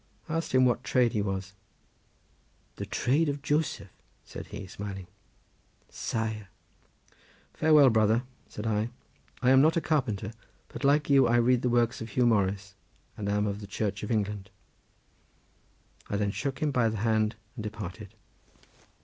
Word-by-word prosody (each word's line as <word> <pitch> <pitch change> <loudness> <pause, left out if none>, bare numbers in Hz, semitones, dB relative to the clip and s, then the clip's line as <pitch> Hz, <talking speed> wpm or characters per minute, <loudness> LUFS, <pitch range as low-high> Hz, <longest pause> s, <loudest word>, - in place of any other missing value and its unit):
I - - -4
asked 165 - -3
him 130 0 +5
what 125 0 +1
trade 125 -2 +2
he 105 - +1
was. 95 -1 -3 1.2
"The - - -5
trade 145 +5 +1
of 140 0 -4
Joseph," 145 -10 -1 0.3
said - - -8
he 100 - -7
smiling. 95 0 -7 0.8
"Saer. 110 -2 -3 1.1
Farewell, 150 -4 +6
brother," 110 +2 +3 0.3
said 105 - -7
I; 110 +1 0 0.5
"I 125 - +5
am 135 0 +7
not 160 +3 +4
a - - +5
carpenter, 115 -10 -1 0.4
but - - -8
like 145 +1 +3
you 135 -3 +6
I 120 - +3
read 120 +1 +4
the 125 - +1
works 120 -1 +1
of 115 - -5
Huw 120 +4 +2
Morris 100 -3 +1 0.4
and 100 -1 -4
am 105 0 +1
of 100 0 -3
the 100 - -8
Church 100 0 -2
of 105 - -5
England." 105 -3 -1 1.6
I 100 - -1
then 100 -1 0
shook 135 +7 -3
him 150 - +2
by 125 -4 +2
the 110 - -3
hand 110 0 +1 0.2
and 120 - -6
departed. 105 -2 -7
110 Hz, 160 wpm, -28 LUFS, 105-130 Hz, 1.6 s, am